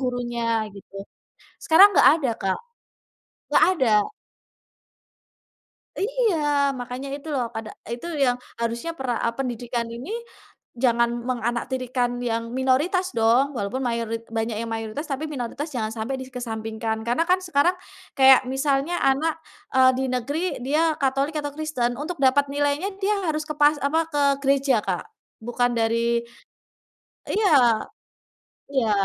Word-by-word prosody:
gurunya 240 -3 -1
gitu. 200 0 -15 0.7
Sekarang 380 +6 +8
nggak - - +8
ada 270 - 0
Kak, 190 -1 0 0.9
nggak - - +3 0.2
ada. 260 - +2 2.2
Iya. 455 -1 +1 0.4
Makanya 250 +2 -6
itu 290 +2 -11
loh 250 -3 0
pada, 220 -1 -5 0.2
eee, 235 - -3
itu 240 - -9 0.2
yang 245 -1 +2 0.2
harusnya 235 +7 -2
pera 255 -2 -2
eee, 230 - 0
pendidikan 240 -2 -3
ini 250 - -7 0.7
jangan 235 -1 +4 0.2
menganaktirikan 245 0 -1
yang 230 -2 -1 0.2
minoritas 295 +9 +2
dong, 230 +4 +4
walaupun 205 +5 -2
mayorit 230 -1 -2
banyak 225 0 -1
yang 230 - -4
mayoritas, 225 +7 -4
tapi 275 +3 -2
minoritas 280 +1 -4
jangan 220 -3 -1
sampai 225 +4 -3
dikesampingkan. 225 -3 -4
Karena 245 +7 +2
kan 365 +1 +4
sekarang, 345 -2 +2 0.5
kayak 265 -1 +7
misalnya 275 +4 0
anak, 305 +4 +1 0.4
eee, 260 0 +7
di 265 - -1
negeri, 255 +5 -2 0.3
dia 310 +3 +2
Katolik 275 +3 0
atau 290 -1 -4
Kristen 275 -6 -1
untuk 335 +4 -4
dapat 280 +1 +3
nilainya 290 +6 0
dia 410 +1 +1
harus 310 0 -1
ke 305 - -3
pas 295 +1 +4
apa, 280 +4 +1
ke 290 -1 0 0.2
gereja 270 -4 +2
Kak, 185 -3 -2 0.4
bukan 245 +1 0
dari 230 +1 +1 1.1
iya. 275 - +3 0.9
Iya, 250 -5 +1
255 Hz, 130 wpm, -24 LUFS, 235-290 Hz, 2.2 s, Sekarang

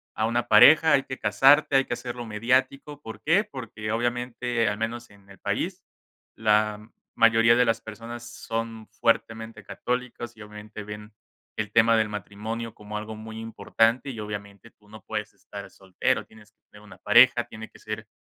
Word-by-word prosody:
a 110 0 0
una 120 +1 -1
pareja, 155 +9 +7
hay 135 - +4
que 130 - -6
casarte. 135 +8 +4
Hay 135 - +2
que - - -3
hacerlo 120 -1 -6
mediático". 130 +6 0
¿Por 110 - -9
qué? 180 +7 +3
Porque 115 - -7
obviamente, 120 0 -1
al 105 - -3
menos 115 +1 -4
en 100 -1 -21
el 95 - -15
país, - - -3 0.5
la 105 0 +1 0.2
mayoría 115 0 +5
de 125 0 +4
las 115 0 +1
personas, 115 +2 -9
son 115 -1 -5
fuertemente 115 -1 -1
católicos, 125 -1 -4
y - - -12
obviamente, 105 0 -10
ven 105 +1 -9 0.4
el 105 -2 -3
tema 115 0 +5
del 110 -1 +1
matrimonio, 110 +3 -6
como 105 0 -7
algo 110 +1 -6
muy 110 +1 -9
importante. 115 +3 0
Y 115 - -8
obviamente, 105 +1 -7
tú 105 - -28
no 110 0 -12
puedes 105 -1 -5
estar 100 -1 -10
soltero, 95 -1 -1
tienes 105 -1 -18
que - - -59
tener 105 0 -15
una 105 - -14
pareja. 120 0 +5
Tiene 110 0 -10
que - - -18
ser 110 0 -6
115 Hz, 175 wpm, -26 LUFS, 105-120 Hz, 0.5 s, pareja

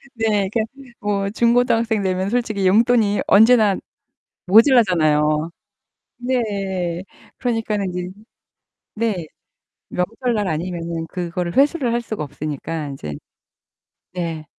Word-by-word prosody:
네. 210 -4 +1
그니까 225 +1 -1 0.3
뭐 200 -1 -1
중고등학생 235 -1 +2
되면 185 +1 -1
솔직히 215 -5 0
용돈이 220 0 +3
언제나 220 -1 +6 0.7
모자라잖아요. 170 - +4 0.7
네. 195 -8 -2 0.3
그러니까는 220 -5 -1
인제 180 0 -4 0.8
네. 210 -7 -2 0.6
명절날 215 +2 -1
아니면은 165 0 -3
그거를 175 0 -4
회수를 275 -3 +3
할 235 - +1
수가 215 -9 -4
없으니까 150 +2 -5
인제 105 - -6 1.0
네. 165 -3 -4
200 Hz, 245 characters per minute, -20 LUFS, 170-225 Hz, 1.0 s, 언제나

